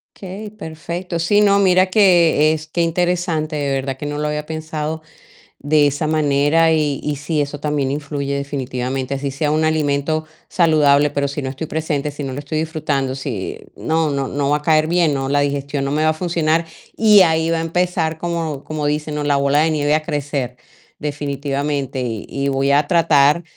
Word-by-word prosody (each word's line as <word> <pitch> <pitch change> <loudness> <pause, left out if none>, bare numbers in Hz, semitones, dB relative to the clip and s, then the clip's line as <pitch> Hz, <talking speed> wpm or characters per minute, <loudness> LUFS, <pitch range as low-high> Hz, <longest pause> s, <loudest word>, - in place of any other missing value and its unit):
Okey, 200 +2 -8
perfecto. 170 -2 -5
Sí, 205 +5 +3
no, 200 -1 +4
mira 185 -1 +4
que 170 -6 +4
es 155 0 -5
qué 170 +2 -1
interesante, 170 -2 0
de 145 -2 -1
verdad 135 0 -2
que 145 - -6
no 145 0 -3
lo 150 - -1
había 150 0 -3
pensado 155 0 -4 0.6
de 145 0 +3
esa 145 +2 -2
manera, 155 +1 +3
y 150 -3 0
y 150 -1 -2
sí, 150 +2 -2
eso 145 0 -3
también 145 -3 -1
influye 140 -1 -3
definitivamente, 135 -1 -3
así 140 0 -3
sea 145 +2 -1
un 155 +1 +1
alimento 155 0 0 0.2
saludable, 150 -4 +3
pero 140 0 -1
si 140 +1 -4
no 130 - -3
estoy 140 +4 -5
presente, 150 -2 -2
si 145 - -7
no 135 -2 -4
lo 130 - -5
estoy 145 +2 -3
disfrutando, 155 -4 -2
si 125 -8 -4 0.2
no 160 -1 0
no 140 -1 -2
no 140 0 -1
va 150 - +3
a 150 - -16
caer 155 0 +3
bien, 170 -2 +2
no, 135 -1 -2
la 145 +1 +2
digestión 140 0 -1
no 140 - -2
me 155 +2 +1
va 155 - +4
a - - +1
funcionar, 165 -1 0 0.3
y 210 -3 +7
ahí 160 -1 +2
va 165 - +1
a - - -1
empezar 165 -1 -1
como 165 -5 -3
como 155 -1 -3
dicen, 150 +1 -2
¿no? 150 - -2
La 145 -1 +2
bola 140 +1 +2
de 160 0 +2
nieve 150 0 +2
a 155 - -2
crecer 140 -5 -3 0.4
definitivamente, 140 -2 -3
y 115 -4 -4
y 140 0 -2
voy 135 0 +1
a 145 +1 +3
tratar 160 -2 +4
150 Hz, 200 wpm, -19 LUFS, 140-160 Hz, 0.6 s, y